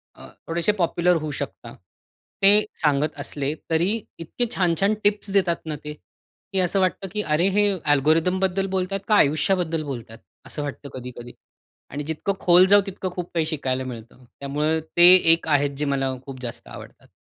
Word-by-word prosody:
अ, - - -13 0.2
थोडेसे 170 +4 +1
पॉप्युलर 175 +1 +1
होऊ 155 -1 -4
शकता. - - -7 0.7
ते 205 +2 +6 0.2
सांगत 150 0 +1
असले 145 0 -3 0.2
तरी 165 +3 +1 0.3
इतके 170 +9 -2
छान-छान 185 +3 +1
टिप्स 205 0 +1
देतात 185 -4 +1
ना 155 - -4
ते, 150 0 -6 0.6
की 190 - +1
असं 185 +2 +1
वाटतं 190 +1 -1
की 210 - -1
अरे 160 0 +1
हे 205 0 +4 0.2
अल्गोरिथमबद्दल 180 +6 +1
बोलतात 190 +1 -2
का 215 - +3
आयुष्याबद्दल 160 +1 +1
बोलतात. 120 -5 -7 0.3
असं 150 - -5
वाटतं 145 0 -7
कधी-कधी. 120 -1 -9 0.6
आणि 145 +1 -5
जितकं 160 +6 -3
खोल 180 +1 +6
जाऊ 205 +1 +6
तितकं 185 -1 -5
खूप 180 -1 -6
काही 165 -2 0
शिकायला 130 -5 -2
मिळतं. 125 0 -10 0.2
त्यामुळे 150 +3 -1 0.2
ते 175 +1 +10 0.2
एक 165 - -2
आहे, 145 -2 +2
जे 150 +2 -2
मला 135 -2 -1
खूप 135 -2 -9
जास्त 120 -2 -7
आवडतात. - - -12
160 Hz, 165 wpm, -23 LUFS, 145-185 Hz, 0.7 s, ते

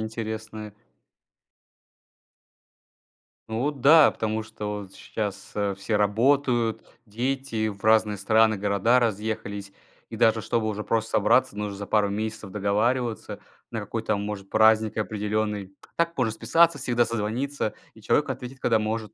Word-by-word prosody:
интересные. 110 -1 -6 2.8
Ну 110 0 -2
вот 145 -2 -2
да, 155 +3 +7
потому 110 0 -2
что 105 -1 -5
вот 95 -1 -12
щас, 105 -3 -5
э, 100 -1 0
все 100 +3 -2
работают, 120 +2 +2 0.2
дети 120 0 -2
в 100 -1 -7
разные 110 -1 +3
страны, 110 +2 +3
города 100 +5 +2
разъехались. 105 -3 -3 0.4
И, - - -7
даже, 110 0 +3
чтобы 110 0 -1
уже 105 0 -3
просто 115 0 -1
собраться, 100 - +3
нужно 105 -1 -4
за 100 - -5
пару 105 -1 +2
месяцев 110 0 -4
договариваться 110 +4 -1 0.3
на 115 - -3
какой-то, 110 0 -2
может, 100 -1 -5
праздник 110 0 +4
определенный. 105 -1 -2
А - - -16 0.2
так 170 0 -22
можно 125 -4 +1
списаться, 165 +9 +3
всегда 120 -1 +1
созвониться, 115 +3 -2 0.2
и - - -17
человек - - +1
ответит, 130 +1 -6
когда 115 -3 +2
может. 110 0 -3
110 Hz, 140 wpm, -25 LUFS, 105-115 Hz, 2.8 s, да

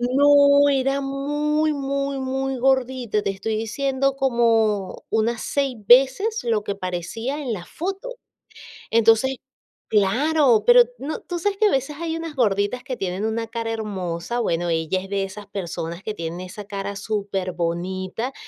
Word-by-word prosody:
No 285 +3 +5
era 275 0 +1
muy, 295 +3 0
muy, 275 -1 -2
muy 265 0 -2
gordita, 255 -3 +1
te 200 - -1
estoy 210 +3 -3
diciendo 270 +4 0
como 230 -7 +1
unas 220 +1 0
6 275 -3 -1
veces 275 - +4
lo 225 -3 +1
que 200 -1 -4
parecía 195 - -4
en 255 -4 -3
la 180 -5 -5
foto. 390 +8 -5 0.8
Entonces 230 +4 +4 0.5
claro, 245 +5 +3
pero - - +8 0.2
no 295 +3 -4
tú 350 -1 -5
sabes 395 +3 -1
que 430 - +4
a - - +2
veces 270 +2 -1
hay 330 -1 -2
unas 330 -2 -6
gorditas 215 0 +1
que 260 -3 -5
tienen 185 +1 -3
una 225 +1 -1
cara 230 0 -4
hermosa. 205 0 -3
Bueno, 175 -5 0
ella 165 +2 0
es 190 - -9
de 195 0 -1
esas 195 +1 -8
personas 170 -2 -5
que 215 - -3
tienen 170 -2 -5
esa 185 +3 -8
cara 200 0 -5
superbonita, 190 +1 -3
235 Hz, 155 wpm, -23 LUFS, 200-275 Hz, 0.8 s, pero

